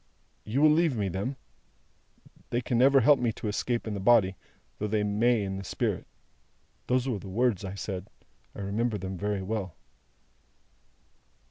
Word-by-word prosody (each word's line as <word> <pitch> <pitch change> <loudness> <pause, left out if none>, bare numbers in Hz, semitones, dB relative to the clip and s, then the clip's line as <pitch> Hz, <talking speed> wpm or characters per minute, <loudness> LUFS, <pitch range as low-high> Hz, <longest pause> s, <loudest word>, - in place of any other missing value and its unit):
'You 125 +8 0
will 155 - +7
leave 155 -5 +2
me 100 -2 0
them? 100 +9 -3 1.1
They 120 - 0
can 120 -1 0
never 135 +1 +6
help 145 +4 +5
me 120 -2 +1
to 110 - -6
escape 120 +3 -1
in 110 - -3
the 100 - -3
body, 95 -2 +4 0.4
though 105 - -1
they 105 0 0
may 110 +2 +2
in 95 -1 -3
the 95 - -6
spirit.' 90 - -2 0.8
Those 125 +1 +1
were 120 -6 -1
the 95 - -9
words 110 -1 +1
I 95 0 -5
said. 95 -1 -5 0.5
I - - -6
remember 105 +3 -1
them 95 -1 -5
very 100 +1 -2
well." 95 -3 -3
105 Hz, 165 wpm, -28 LUFS, 100-120 Hz, 1.1 s, will